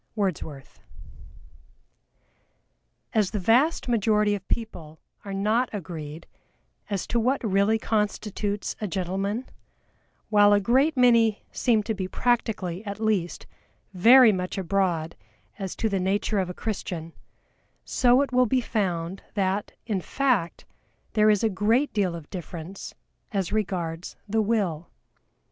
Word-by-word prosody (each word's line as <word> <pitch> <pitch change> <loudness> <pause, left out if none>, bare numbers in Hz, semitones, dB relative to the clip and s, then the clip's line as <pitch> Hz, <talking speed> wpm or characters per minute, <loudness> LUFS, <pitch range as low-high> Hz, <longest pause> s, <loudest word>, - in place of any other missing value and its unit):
Wordsworth. 160 -9 -4 2.3
As 210 -4 +2
the 215 - -3
vast 245 - +2
majority 210 -3 +2
of 195 -2 -5
people 165 -9 -4 0.2
are 200 - -7
not 215 +6 +1
agreed 165 -5 -7 0.6
as 200 -3 -2
to 235 - 0
what 255 +4 +1
really 200 +1 +2
constitutes 210 -1 -2
a 210 - -1
Gentleman, 195 +6 -2 0.8
while 205 -1 +6
a 205 - +5
great 265 +9 +2
many 230 -4 +4
seem 225 -4 +2
to 220 - -2
be 190 -3 -4
practically, 210 -5 -1
at 200 -1 -6
least, 210 -6 -1 0.5
very 235 +6 +7
much 185 -1 -3
abroad 180 -4 0 0.4
as 190 -2 -4
to 225 - 0
the 200 -3 0
nature 200 +3 0
of 185 -1 -1
a - - -4
Christian, 175 -6 -5 0.7
so 250 +2 +4
it 275 - -5
will 250 0 +3
be 255 +4 +2
found 190 -6 -2
that, 195 0 0
in 205 -5 -1
fact, 245 -8 0 0.5
there 215 -1 +4
is 210 -1 +3
a - - +4
great 220 +8 +1
deal 190 -5 0
of 160 -3 -9
difference 175 0 -7 0.4
as 195 -4 -2
regards 180 -5 -3
the 220 +2 +1
Will. 200 -7 -1
205 Hz, 130 wpm, -25 LUFS, 185-225 Hz, 2.3 s, very